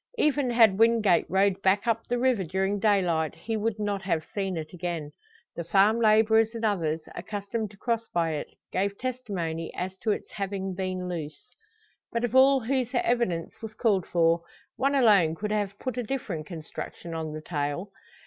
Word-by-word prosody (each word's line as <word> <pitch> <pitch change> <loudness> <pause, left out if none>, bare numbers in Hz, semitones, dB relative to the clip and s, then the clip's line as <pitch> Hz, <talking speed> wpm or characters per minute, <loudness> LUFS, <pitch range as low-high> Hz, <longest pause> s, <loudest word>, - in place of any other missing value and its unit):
Even 290 - +2
had 225 -4 +5
Wingate 225 -5 +4
rowed 195 0 +2
back 195 +3 +2
up 230 -1 0
the 245 - 0
river 245 -5 +2
during 190 +4 -1
daylight, 180 -7 +2
he 225 - -4
would 220 0 -1
not 205 -2 -2
have 165 -5 -1
seen 195 -3 -2
it 155 +2 -6
again. 170 -4 -4 0.4
The 170 - -4
farm 200 +6 +4
labourers 220 0 +4
and 230 0 -2
others, 165 -6 0
accustomed 205 +3 -4
to 205 - -17
cross 230 +2 -1
by 165 -2 +1
it, 150 -2 -3 0.2
gave 200 +1 -1
testimony 190 -11 -3
as 185 +1 -4
to 220 - -2
its 210 - -2
having 195 -1 -3
been 185 -1 -3
loose. 160 - -6 0.6
But 235 0 -1
of 240 +1 -1
all 270 0 +6
whose 255 +1 0
evidence 235 -9 0
was 220 -1 -7
called 200 -6 +1
for, 165 -1 +3 0.3
one 275 +2 +1
alone 200 - +5
could 210 +5 -4
have 205 -2 -1
put 255 +1 -4
a - - -1
different 210 - -4
construction 165 +1 -7
on 160 -1 -3
the 155 - -6
tale. 155 +5 -3
200 Hz, 175 wpm, -27 LUFS, 175-225 Hz, 0.6 s, all